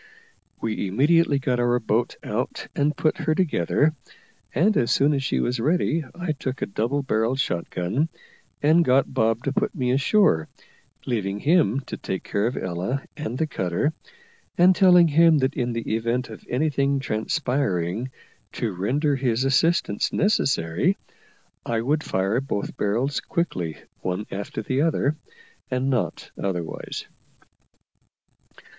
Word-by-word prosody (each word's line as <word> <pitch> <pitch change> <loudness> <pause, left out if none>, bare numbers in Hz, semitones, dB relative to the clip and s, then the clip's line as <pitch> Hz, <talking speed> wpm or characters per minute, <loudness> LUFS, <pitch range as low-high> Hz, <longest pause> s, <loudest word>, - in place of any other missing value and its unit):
We 110 -3 -2
immediately 145 - +3
got 130 -2 0
our 120 0 +2
boat 115 +1 0
out - - -3
and 150 +2 +1
put 155 +3 +1
her 155 -1 +1
together; 155 - +2 0.6
and, 195 - +2
as 120 - +2
soon 145 +2 +3
as 140 - 0
she - - 0
was 125 0 0
ready, 160 +3 +1
I 175 -2 -2
took 135 -3 -4
a - - -1
double 120 +8 -1
barrelled 115 +1 0
shot 90 -10 -1
gun, 115 - -1 0.5
and 160 +3 +5
got 130 -2 +2
Bob 115 +1 +1
to - - -1
put 210 0 -1
me 125 -5 0
ashore, 135 - +3 0.6
leaving 100 -5 -1
him 145 - +3
to - - -7
take 95 - -4
care 100 +2 0
of 125 - -3
Ella 95 +10 -2
and 140 -5 -4
the 160 - +1
cutter, 95 - -1 0.6
and 180 +2 +6
telling 180 -2 +6
him 165 +1 +5
that 135 0 +1
in 120 -3 -1
the 115 -1 -4
event 115 +2 -1
of 110 - -10
anything 140 0 +1
transpiring 120 - -1 0.4
to 110 -4 -2
render 140 - 0
his 125 -2 0
assistance 135 -5 +2
necessary 140 - +1 0.7
I 115 -1 -1
would 145 +6 0
fire 95 +6 0
both 135 -7 -3
barrels 120 +8 0
quickly 90 - -2 0.2
one 95 +3 -3
after 100 +2 -5
the 130 +6 0
other, 155 -2 +1 0.5
and 130 +1 0
not 125 -4 -2
otherwise. 90 -4 -4
130 Hz, 145 wpm, -24 LUFS, 110-150 Hz, 0.7 s, and